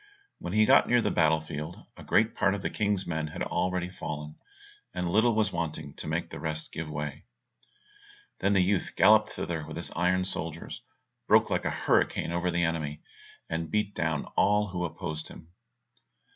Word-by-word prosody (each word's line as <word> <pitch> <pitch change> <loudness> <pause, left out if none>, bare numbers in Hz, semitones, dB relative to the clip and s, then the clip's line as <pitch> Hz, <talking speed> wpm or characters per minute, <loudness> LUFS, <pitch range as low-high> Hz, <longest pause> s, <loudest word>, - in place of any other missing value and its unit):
When 85 - -5
he 110 0 +5
got - - +6
near 120 - +4
the - - +1
battle 80 -1 +3
field 80 +2 -7
a - - -11
great 110 +1 +3
part 100 +1 +2
of 100 - -6
the - - -1
King's 100 -2 0
men 80 -2 -2
had 75 - -4
already 90 -1 -1
fallen, 75 -4 -6 0.6
and 90 - -1
little 110 +3 +4
was 110 -2 +2
wanting 75 -3 -3
to - - -6
make - - -2
the - - -7
rest 80 0 -3
give 80 -1 -5
way. 75 -1 -5 1.1
Then 100 - +2
the 95 -2 +4
youth 95 0 0
galloped - - +6
thither 80 -2 -4
with 80 +1 -8
his 85 - -6
iron 90 +2 +1
soldiers, 80 -3 -3 0.5
broke - - +5
like - - 0
a - - +2
hurricane - - +1
over 85 +1 0
the 85 0 +1
enemy, 80 -3 -2 0.4
and 80 0 -3
beat 105 +2 0
down 80 -3 -1
all 105 0 +3
who 90 -1 -2
opposed 80 -1 -5
him. 80 - -13
85 Hz, 185 wpm, -29 LUFS, 80-95 Hz, 1.1 s, got